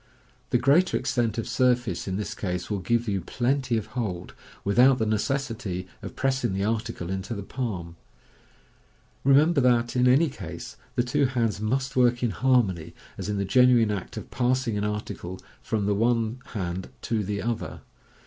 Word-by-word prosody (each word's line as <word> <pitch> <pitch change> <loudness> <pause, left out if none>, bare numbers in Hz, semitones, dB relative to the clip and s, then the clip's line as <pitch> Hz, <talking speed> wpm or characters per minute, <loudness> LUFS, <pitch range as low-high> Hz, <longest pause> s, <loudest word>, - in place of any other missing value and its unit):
The - - +3
greater 145 +9 +4
extent 120 -4 0
of 115 - -2
surface 120 -5 +1
in 95 0 -1
this 105 0 -3
case 90 -1 -4
will 100 - 0
give 115 +5 0
you 100 -3 0
plenty 125 +5 0
of 110 - -2
hold, 95 -8 -3 0.3
without 125 +6 +5
the 110 - 0
necessity 110 -4 -2
of - - -8
pressing 130 -5 0
the 95 +1 -1
article 110 -4 -2
into 95 +4 -3
the 100 - -5
palm. 95 -9 -4 1.3
Remem 145 +5 +5
ber 140 - +3
that, 120 -1 +2
in 125 0 +4
any 135 +7 +5
case, 90 - -8 0.2
the 120 - +2
two 140 +3 +2
hands 115 -5 -1
must 130 +5 -1
work 125 -1 +3
in 120 - +2
harmony, 95 -12 +1 0.2
as - - -5
in 105 - -1
the 100 - 0
genuine 120 0 +5
act 100 -3 -5
of - - -7
passing 125 -2 +1
an 100 - -1
article 105 -3 -4 0.2
from 105 -3 -1
the 105 - +2
one 115 +2 +1 0.2
hand 95 -2 -3
to 110 -2 0
the 100 +1 -2
other. 115 +1 -3
115 Hz, 175 wpm, -26 LUFS, 100-125 Hz, 1.3 s, without